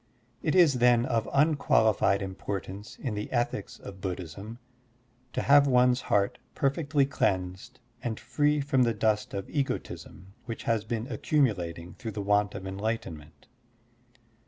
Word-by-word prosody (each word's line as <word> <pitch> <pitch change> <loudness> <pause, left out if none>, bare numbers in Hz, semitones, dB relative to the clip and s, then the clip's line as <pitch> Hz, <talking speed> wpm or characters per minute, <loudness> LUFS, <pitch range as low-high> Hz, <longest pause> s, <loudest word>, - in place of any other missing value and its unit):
It 155 - 0
is, 160 -8 +5
then, 120 -1 +5
of 115 -3 0
tmqualified 115 -9 +3
importance 95 +1 -6
in 125 -6 -4
the 105 0 -5
ethics 120 -1 -2
of 95 -1 -11
Buddhism 95 +4 -6 0.8
to - - -1
have 140 0 +6
one's 125 -1 +4
heart 100 -1 +1 0.2
perfectly 140 0 +1
cleansed 95 -8 -2 0.2
and 110 -2 -3
free 150 0 +1
from 135 -2 +1
the 115 -2 +2
dust 105 -1 0
of 100 - -4
egotism 100 - -4
which 115 -2 -6
has 115 -2 0
been 115 0 -3
acctunulating 95 - -1
through 115 -3 -6
the 105 - -3
want 105 0 +2
of 95 -1 -6
enlightenment. 95 -7 -5
110 Hz, 135 wpm, -28 LUFS, 95-130 Hz, 0.8 s, have